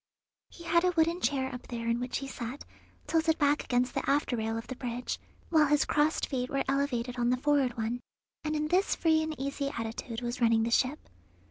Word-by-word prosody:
He 340 - -13
had 340 +1 +3
a 365 0 +3
wooden 335 +2 +3
chair 265 -2 0
up 250 - -8
there 235 -1 -5
in 235 +1 +1
which 250 0 -2
he 275 - -5
sat, 255 +1 -6 0.4
tilted 320 -1 +2
back 290 -1 +2
against 250 0 +1
the - - -2
after 280 -2 +2
rail 225 0 -1
of 225 - -5
the 260 - -6
bridge, 245 0 -4 0.3
while 310 -3 +5
his 295 0 +3
crossed 300 +1 +2
feet 255 -2 -2
were 275 0 0
elevated 255 -3 0
on 240 0 +2
the 250 - +2
forward 270 -3 +2
one, 230 +2 -1 0.4
and 305 0 -1
in 305 0 -1
this 370 +4 +2
free 320 -1 +3
and 315 -2 -4
easy 280 +1 -2
attitude 230 0 -5
was 240 0 -4
running 230 -1 +4
the 230 - -1
ship. 260 +5 +1
270 Hz, 215 wpm, -30 LUFS, 240-300 Hz, 0.4 s, while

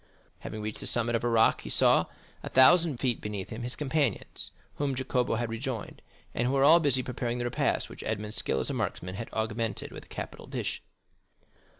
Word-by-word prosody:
Having 110 -1 -6
reached 105 0 -4
the - - -4
summit 120 0 +3
of 115 - -1
a 120 - +1
rock, 115 -1 +4
he - - -8
saw, - - +4 0.4
a - - -6
thousand 155 +2 +6
feet 125 -2 -1
beneath 105 -3 -5
him, 115 +1 -6
his 125 +1 -4
companions, 145 -5 -1 0.3
whom 140 -2 -1
Jacopo 125 -2 0
had 115 0 -2
rejoined, 115 -1 -5 0.3
and 120 - 0
who 130 - 0
were 135 0 +3
all 160 +4 +8
busy 135 -5 +2
preparing 120 -1 -3
the 120 - -2
repast 120 - 0
which - - -10
Edmond's 105 0 -3
skill 65 - +1
as 65 - -1
a - - -3
marksman 90 +1 -3
had 105 +4 -6
augmented 110 0 -2
with - - -10
a - - -24
capital - - -7
dish. - - -3
120 Hz, 205 wpm, -29 LUFS, 110-130 Hz, 0.4 s, all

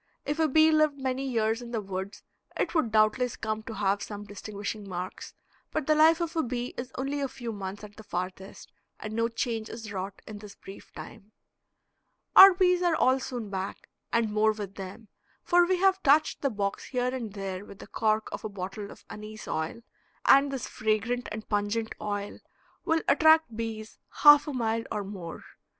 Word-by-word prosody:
If 295 +2 -2
a 320 - +4
bee 315 +2 +5
lived 310 -2 +3
many 265 0 -2
years 225 -1 0
in 240 - -8
the 235 -2 -2
woods 195 -1 -6 0.3
it - - -1
would 315 -10 +1
doubtless 220 +4 +2
come 215 -3 -3
to 220 0 -8
have 200 0 0
some 205 -1 -6
distinguishing 205 0 -6
marks, 180 0 -6 0.3
but 310 -3 -2
the 310 - +4
life 315 +2 +5
of 335 0 -3
a 325 - +2
bee 245 -2 -3
is 250 +1 -6
only 275 +2 -2
a 275 - 0
few 240 -3 -6
months 200 0 -6
at 205 -1 -11
the 220 - -10
farthest, 185 -1 -6 0.3
and 215 0 -6
no 230 +1 +1
change 230 -1 -3
is 225 -2 -8
wrought 195 +1 -6
in 210 -1 -8
this 205 -1 -11
brief 195 - -12
time. 215 -1 -11 1.0
Our 385 -1 +11
bees 360 -1 +3
are 350 -2 +2
all 260 -3 +3
soon 240 -5 -5
back, 190 0 -5 0.2
and 230 -2 +1
more 215 +1 +3
with 205 -2 -7
them, 195 +3 -9 0.4
for 350 0 +4
we 370 0 +2
have 385 +1 +3
touched 295 +1 +3
the 275 - +1
box 200 -4 -3
here 250 -1 -1
and 230 -6 -5
there 195 -1 -5
with 200 - -12
the - - -11
cork 215 0 0
of - - -6
a 215 - -3
bottle 200 +1 -6
of - - -14
anise 215 0 -9
oil, 160 +9 -3 0.4
and 275 +1 +6
this 270 -3 -4
fragrant 220 +3 -1
and 215 0 -6
pungent 210 +2 -1
oil 205 -1 -4 0.5
will 325 0 +1
attract 315 -6 +5
bees 220 -1 -6 0.2
half 295 0 +9
a 295 - -3
mile 230 -2 -1
or 210 -2 -2
more. 190 -4 -8
220 Hz, 195 wpm, -28 LUFS, 205-270 Hz, 1.0 s, Our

